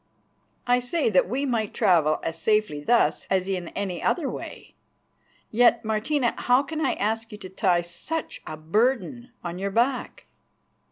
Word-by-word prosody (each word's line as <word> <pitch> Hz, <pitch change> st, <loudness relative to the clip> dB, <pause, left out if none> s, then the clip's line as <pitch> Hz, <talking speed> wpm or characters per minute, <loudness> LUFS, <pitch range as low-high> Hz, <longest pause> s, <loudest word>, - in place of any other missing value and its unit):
"I 245 Hz, 0 st, +3 dB
say 250 Hz, +1 st, 0 dB
that 185 Hz, -1 st, +3 dB
we 270 Hz, +5 st, -1 dB
might 225 Hz, -5 st, -1 dB
travel 170 Hz, -8 st, +3 dB
as 165 Hz, 0 st, -4 dB
safely 210 Hz, -9 st, +1 dB
thus 240 Hz, +9 st, +2 dB
as 190 Hz, -1 st, +1 dB
in 185 Hz, -3 st, -2 dB
any 190 Hz, -3 st, -3 dB
other 330 Hz, -6 st, 0 dB
way. -, -, -8 dB, 0.8 s
Yet, 235 Hz, 0 st, +4 dB
Martina, 235 Hz, +4 st, 0 dB
how 250 Hz, +2 st, +3 dB
can 315 Hz, +2 st, -4 dB
I -, -, +2 dB
ask 225 Hz, +2 st, -2 dB
you 210 Hz, -, -8 dB
to 190 Hz, -3 st, -9 dB
tie 185 Hz, -2 st, +2 dB
such 175 Hz, -, -5 dB
a 155 Hz, -, -6 dB
burden 240 Hz, -, 0 dB
on 175 Hz, 0 st, -5 dB
your 200 Hz, +1 st, -1 dB
back?" 245 Hz, +5 st, -1 dB
220 Hz, 160 wpm, -25 LUFS, 185-245 Hz, 0.8 s, Yet